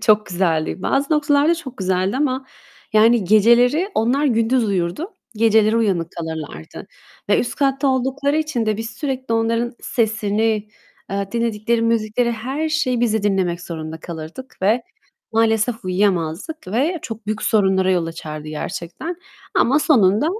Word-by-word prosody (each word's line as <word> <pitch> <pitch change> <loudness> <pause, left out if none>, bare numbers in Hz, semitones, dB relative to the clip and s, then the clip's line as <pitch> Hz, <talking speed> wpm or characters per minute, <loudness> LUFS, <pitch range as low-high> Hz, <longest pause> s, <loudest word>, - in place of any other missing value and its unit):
çok 210 0 +3
güzeldi. 175 -1 -1
Bazı 280 +3 +1
noktalarda 295 +2 +3
çok 265 -6 -8
güzeldi 185 +2 0
ama 265 -2 -1 0.5
yani 225 0 +5
geceleri 235 - +4
Onlar 250 +6 +2
gündüz 230 0 +2
uyurdu 195 - -2 0.2
geceleri 220 0 +3
uyanık 190 -7 +1
kalırlardı 160 - -7 0.4
ve 205 - +4
üst 240 - -3
katta 275 -1 +1
oldukları 270 +3 0
için 305 -8 -1
de 215 -1 +1
biz 225 +1 -5
sürekli 260 -5 -3
onların 230 +1 0
sesini, 220 -2 0 0.4
eee, 195 0 -2
dinledikleri 230 0 0
müzikleri, 230 +1 +1
her 265 +8 -3
şeyi 280 -6 0
biz 235 -3 +2
de 220 - 0
dinlemek 190 -4 0
zorunda 160 -1 -6
kalırdık 170 +11 -8
ve 225 +5 +3 0.5
maalesef 225 0 +1
uyuyamazdık 185 - -1
ve 290 - 0
çok 225 -2 -7
büyük 215 0 -2
sorunlara 190 -3 +2
yol 175 -3 +1
açardı 155 -2 -7
gerçekten. 175 - -5 0.4
Ama 270 +4 +4
sonunda 225 - +3
225 Hz, 140 wpm, -20 LUFS, 190-260 Hz, 0.5 s, yani